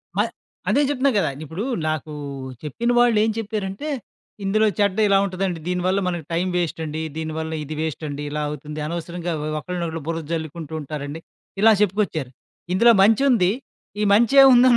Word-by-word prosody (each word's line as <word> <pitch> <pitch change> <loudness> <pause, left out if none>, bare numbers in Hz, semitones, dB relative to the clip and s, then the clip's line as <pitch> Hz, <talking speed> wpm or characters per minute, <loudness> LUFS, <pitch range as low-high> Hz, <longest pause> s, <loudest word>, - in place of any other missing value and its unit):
మ - - -1 0.5
అదే 285 - +4
జెప్తున్నా 280 -1 +2
గదా! 200 - +2
ఇప్పుడు 160 +7 -5 0.3
నాకు 155 0 -3 0.5
చెప్పిన 195 - -2
వాళ్ళేం 225 -3 +4
చెప్పారంటే, 210 +4 -3 0.5
"ఇందులో 215 +3 +3
చెడ్డ 200 -2 +2
ఇలా 200 -1 +5
ఉంటదండి. 185 -2 -2
దీని 180 0 0
వల్ల 190 +2 +2
మనకి 175 -4 -3
టైం 175 +3 +1
వేస్టండి. 160 -2 -2 0.2
దీని 160 0 -3
వల్ల 160 0 -3
ఇది 155 +1 -6
వేస్టండి 150 -2 -4
ఇలా 150 +1 -3
అవుతుంది. 150 +1 -6
అనవసరంగా 170 +1 -4 0.3
ఒకలునొకళ్ళు 170 -1 -4
బురద 165 -1 -3
జల్లుకుంటుంటారండి." 155 -2 -5 0.4
ఇలా 225 +1 +7
చెప్పుకొచ్చారు. 185 - 0 0.4
ఇందులో 230 +6 +6
మంచుంది, 225 -3 +4 0.5
ఈ - - +2
మంచే 235 +6 +6
ఉందని 250 0 +7
180 Hz, 140 wpm, -22 LUFS, 160-210 Hz, 0.5 s, ఇలా